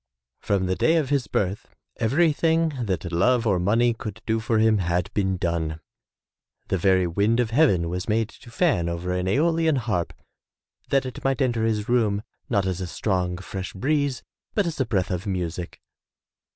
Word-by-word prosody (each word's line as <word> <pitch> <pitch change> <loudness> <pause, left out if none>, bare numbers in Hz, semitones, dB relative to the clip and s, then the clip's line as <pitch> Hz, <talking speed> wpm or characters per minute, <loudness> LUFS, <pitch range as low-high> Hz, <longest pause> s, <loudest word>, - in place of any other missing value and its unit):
From 100 -2 0
the 95 0 0
day 160 - +3
of 155 -5 +1
his 140 -3 +1
birth 100 +1 -2 0.2
everything 160 +5 +2 0.2
that 90 -3 -2
love 115 +8 +2
or 100 -5 +2
money 115 +6 +3
could 110 -2 -7
do 110 0 +1
for 110 +1 0
him 110 -1 +4
had 90 -1 -1
been 95 -2 0
done. 80 -2 -2 0.9
The 95 - 0
very 95 0 +3
wind 100 +7 +1
of 115 -2 +1
heaven 115 - +3
was 90 +4 -4
made 110 0 +1
to 120 - -15
fan 115 - +1
over 85 +2 -3
an 90 0 -1
aeolian 160 - +2
harp 110 -9 -1 0.8
that 135 -1 +2
it 130 - -7
might 135 -1 +1
enter 120 -4 +1
his 105 -2 -1
room, 110 -4 +1 0.3
not 100 -5 +1
as 95 0 -2
a 90 - -3
strong, 90 -1 -1
fresh 95 0 -6
breeze, 140 +4 0 0.3
but 205 - +2
as 170 -3 -4
a 130 - 0
breath 100 -3 0
of 90 +3 -3
music. 90 -2 -4
105 Hz, 180 wpm, -24 LUFS, 90-125 Hz, 0.9 s, him